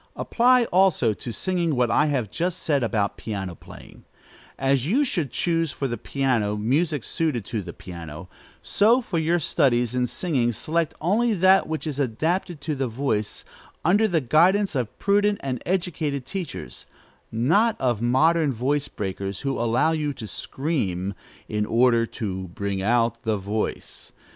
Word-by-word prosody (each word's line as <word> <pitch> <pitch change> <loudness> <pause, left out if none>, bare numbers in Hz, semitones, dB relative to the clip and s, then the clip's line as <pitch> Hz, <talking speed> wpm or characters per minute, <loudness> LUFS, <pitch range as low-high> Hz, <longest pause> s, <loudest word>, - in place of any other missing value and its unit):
Apply 250 +1 +3
also 180 - +4
to 120 - -6
singing 175 - -1
what 125 -1 +2
I 150 - +3
have 125 -8 -1
just 175 +6 -2
said 145 -3 +2
about 105 -4 0
piano 100 -3 -4
playing: - - -14 0.5
as 135 0 +1
you 265 - +3
should 170 - -1
choose 165 -3 0
for 135 +1 -3
the 120 - -2
piano 120 -4 0
music 140 +6 0
suited 145 -10 -1
to 110 -1 -3
the 90 -2 -7
piano, 85 -2 -9 0.4
so 235 +5 +3
for 175 -7 -2
your 165 +2 +2
studies 125 -7 +1
in 125 -1 +1
singing 125 -7 0
select 160 +7 -1
only 215 +7 +2
that 190 +1 +5
which 160 0 -3
is 145 -3 -3
adapted 160 - -1
to 155 - -2
the 135 -2 -1
voice; 110 -4 -2 0.4
under 205 +6 +4
the 170 -6 +1
guidance 180 - +3
of 125 -6 -3
prudent 205 0 +2
and 130 -3 -3
educated 160 -7 -1
teachers, 190 -4 -6 0.4
not 165 - +2
of 120 -4 0
modern 150 +6 +3
voice 135 +4 0
breakers, 95 -2 -4
who 135 -1 -1
allow 120 +7 +2
you 150 -2 -1
to 115 - -7
scream, 100 - -2 0.3
"in 105 0 -1
order 115 +1 +3
to 95 -6 -4
bring 100 +2 -3
out 115 +2 +1
the 110 -2 0
voice." 105 +3 -4
135 Hz, 160 wpm, -24 LUFS, 110-170 Hz, 0.5 s, that